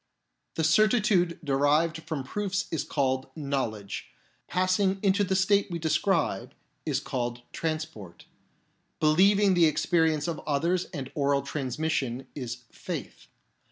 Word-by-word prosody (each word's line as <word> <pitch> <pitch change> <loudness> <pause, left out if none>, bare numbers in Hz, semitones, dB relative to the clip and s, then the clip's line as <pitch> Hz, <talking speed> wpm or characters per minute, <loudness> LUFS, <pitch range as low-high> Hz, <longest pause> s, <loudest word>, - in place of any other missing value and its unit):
The 160 - 0
certitude 200 0 +3
derived 150 +3 +2
from 155 -5 -3
proofs 200 +6 -2
is 155 -3 -1
called 130 -2 0
" - - -39 0.2
knowledge 110 -7 -3 0.2
"; - - -37
passing 185 +1 +1
into 200 +1 +3
the 190 -1 0
state 200 +2 +3
we 170 - -3
describe 165 - 0 0.3
is - - +1
called 120 -1 -3
" - - -41
trans 160 -1 -1
port 100 - -13 0.4
"; - - -43 0.3
believing 195 +6 +5
the 170 -2 +5
experience 160 0 +1
of 170 - -3
others 170 +5 +1
and 135 -5 -7
oral 140 -2 +1
transmission 135 -2 -2
is 125 -3 -6
" - - -34
faith." - - -7
160 Hz, 145 wpm, -28 LUFS, 135-185 Hz, 0.4 s, believing